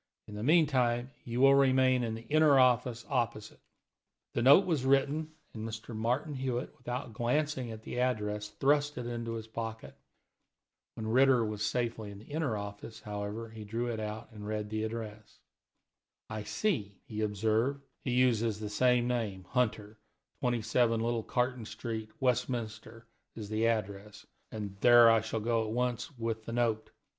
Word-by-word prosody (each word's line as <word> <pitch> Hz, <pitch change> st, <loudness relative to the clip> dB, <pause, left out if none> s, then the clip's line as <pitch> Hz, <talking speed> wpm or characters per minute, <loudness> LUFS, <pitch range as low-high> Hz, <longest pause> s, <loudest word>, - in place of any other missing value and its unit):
In 105 Hz, -, -10 dB
the 105 Hz, -, -5 dB
meantime, 130 Hz, -4 st, +3 dB
you 120 Hz, +1 st, -2 dB
will 135 Hz, 0 st, +7 dB
remain 130 Hz, -2 st, +4 dB
in 115 Hz, -1 st, -2 dB
the 115 Hz, +1 st, -9 dB
inner 155 Hz, -1 st, +5 dB
office 125 Hz, -2 st, +3 dB
opposite." 120 Hz, -6 st, -2 dB, 0.7 s
The -, -, 0 dB
note 140 Hz, +10 st, +7 dB
was 160 Hz, -7 st, 0 dB
written, 145 Hz, +4 st, +1 dB, 0.2 s
and 110 Hz, 0 st, -5 dB, 0.2 s
Martin 125 Hz, +7 st, -1 dB
Hewitt, 130 Hz, -2 st, -3 dB
without 125 Hz, -1 st, -5 dB
glancing 130 Hz, +2 st, 0 dB
at 110 Hz, -1 st, -8 dB
the 125 Hz, -, -4 dB
address, 105 Hz, -4 st, -1 dB
thrust 145 Hz, +6 st, +1 dB
it 125 Hz, -, -4 dB
into 115 Hz, -1 st, -4 dB
his 110 Hz, -1 st, -5 dB
pocket. 110 Hz, 0 st, -6 dB, 1.0 s
When 110 Hz, -, -5 dB
Ritter 125 Hz, +1 st, +4 dB
was 105 Hz, -1 st, -3 dB
safely 115 Hz, -3 st, -2 dB
in 100 Hz, -, -9 dB
the 105 Hz, -, -13 dB
inner 145 Hz, -8 st, -1 dB
office, 100 Hz, +2 st, -8 dB
however, 105 Hz, +2 st, -5 dB
he 110 Hz, -1 st, -8 dB
drew 115 Hz, +4 st, -3 dB
it 110 Hz, -, -4 dB
out 110 Hz, +1 st, -5 dB
and 105 Hz, -1 st, -9 dB
read 105 Hz, -1 st, -3 dB
the 110 Hz, 0 st, -1 dB
address. 110 Hz, -1 st, -7 dB, 0.9 s
"I 110 Hz, -1 st, -4 dB
see," 105 Hz, -, -1 dB
he 110 Hz, -5 st, -5 dB
observed, 110 Hz, +6 st, 0 dB, 0.2 s
"he -, -, -3 dB
uses 115 Hz, -4 st, +2 dB
the 105 Hz, -1 st, -4 dB
same 125 Hz, +2 st, +3 dB
name, 110 Hz, -6 st, -2 dB
Hunter; 110 Hz, -4 st, -1 dB, 0.4 s
27 120 Hz, -1 st, +1 dB
Little 115 Hz, 0 st, 0 dB
Carton 125 Hz, 0 st, -1 dB
Street, 110 Hz, 0 st, -5 dB
Westminster, 115 Hz, -3 st, -2 dB, 0.3 s
is 105 Hz, -2 st, -7 dB
the 110 Hz, +1 st, +1 dB
address, 105 Hz, -2 st, -3 dB, 0.3 s
and 105 Hz, -3 st, -5 dB
there 120 Hz, -1 st, +8 dB
I 115 Hz, -1 st, +4 dB
shall 110 Hz, 0 st, -3 dB
go 115 Hz, 0 st, +1 dB
at 110 Hz, -, -4 dB
once 125 Hz, +2 st, -2 dB
with 115 Hz, -1 st, -3 dB
the 115 Hz, -, -5 dB
note. 115 Hz, -2 st, 0 dB
115 Hz, 160 wpm, -31 LUFS, 110-125 Hz, 1.0 s, there